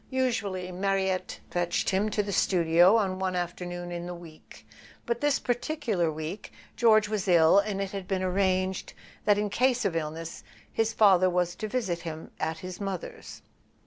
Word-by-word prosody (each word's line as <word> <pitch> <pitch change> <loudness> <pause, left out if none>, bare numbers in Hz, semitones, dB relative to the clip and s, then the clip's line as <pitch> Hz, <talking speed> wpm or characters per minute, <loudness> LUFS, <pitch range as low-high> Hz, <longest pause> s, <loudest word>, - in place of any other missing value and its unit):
Usually 220 -8 -1
Mariette 190 0 -1
fetched 175 +1 0
him 195 +3 +1
to 210 0 0
the 200 - -4
studio 175 +1 +4
on 190 -4 +1
one 185 -1 -1
afternoon 175 0 -4
in 175 0 -5
the 175 - -5
week; 165 -2 -14 0.4
but 235 0 -2
this 290 -1 +2
partic¬ 245 +6 -2 0.2
ular 170 -4 +1
week 155 +6 -6 0.2
George 215 -3 +4
was 210 -2 -2
ill, 170 +1 +6
and 200 -1 -2
it 195 -1 -3
had 195 -2 -6
been 190 -1 -1
arranged 185 0 0 0.3
that 205 -1 +4
in 205 -1 -1
case 250 -1 +2
of 185 -4 0
illness 165 +1 -4 0.3
his 225 0 +1
father 190 -4 +5
was 180 -1 0
to 215 - -5
visit 205 -7 -2
him 160 -2 -7
at 160 0 -2
his 185 +2 -7
mother's. 195 -3 -6
185 Hz, 175 wpm, -28 LUFS, 175-210 Hz, 0.4 s, ill